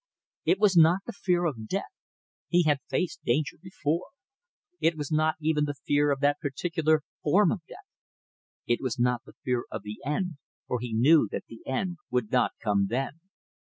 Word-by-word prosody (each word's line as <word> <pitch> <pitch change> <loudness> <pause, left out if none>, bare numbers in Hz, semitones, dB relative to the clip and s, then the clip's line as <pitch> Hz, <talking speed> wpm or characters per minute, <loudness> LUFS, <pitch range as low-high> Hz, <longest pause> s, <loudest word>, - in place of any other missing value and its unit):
It 370 - +4
was 200 -3 +4
not 170 +3 +6
the - - -5
fear 180 -3 +1
of 115 -9 -3
death - - -3 0.5
he 175 0 +3
had 150 -3 +2
faced 180 - -2
danger 140 +5 0
before 175 -3 -2 0.7
it 165 -1 +2
was 145 -1 -4
not 155 0 +2
even 155 -1 +1
the 145 -1 -3
fear 145 +2 +1
of 140 -1 0
that 145 0 +3
particular 155 +1 0 0.2
form 180 +4 +4
of 195 - -2
death. 395 - -12 0.8
It 120 - +1
was 130 -4 -2
not 125 0 +1
the - - -14
fear 125 -2 0
of 110 -2 -6
the 105 0 -7
end, 150 +3 -2 0.3
for 125 - -2
he 120 0 -5
knew 125 +2 +5
that - - -3
the 115 - -12
end 175 +7 -2
would 125 -4 -1
not - - +2
come 100 -1 +2
then. 135 +6 -2
150 Hz, 185 wpm, -28 LUFS, 125-165 Hz, 0.8 s, not